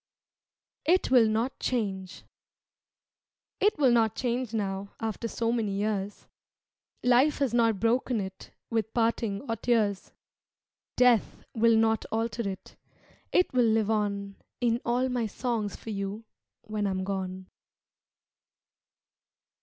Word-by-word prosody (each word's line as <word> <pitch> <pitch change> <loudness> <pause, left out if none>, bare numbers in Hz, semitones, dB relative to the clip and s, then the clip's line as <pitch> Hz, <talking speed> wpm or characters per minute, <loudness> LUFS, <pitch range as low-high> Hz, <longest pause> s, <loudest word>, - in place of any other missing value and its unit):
"It 345 -1 +2
Will 245 -4 +6
Not 225 +4 -1
Change" 195 -7 -3 1.4
It 415 +2 +3
will 270 -4 +4
not 225 -3 +3
change 245 -1 -2
now 200 -2 -3
After 225 +1 -3
so 230 0 -1
many 225 -4 -1
years; 205 0 -2 0.8
Life 250 +5 +4
has 275 -5 0
not 230 -4 +3
broken 235 +1 +1
it 190 -1 -7 0.2
With 225 -1 -1
parting 225 -3 0
or 230 - -1
tears; 215 -4 0 0.9
Death 250 -3 +3
will 230 0 +4
not 225 0 +2
alter 225 -1 -1
it, 190 - -9 0.6
It 360 - +2
will 245 -2 +4
live 220 -1 +2
on 200 -2 -1 0.2
In 240 0 +1
all 245 +2 +1
my 245 -3 -1
songs 225 -2 -2
for 225 - -8
you 200 +2 -4 0.4
When 215 -2 -2
I - - 0
am 190 0 -2
gone. 190 -1 -4
225 Hz, 125 wpm, -28 LUFS, 200-240 Hz, 1.4 s, Will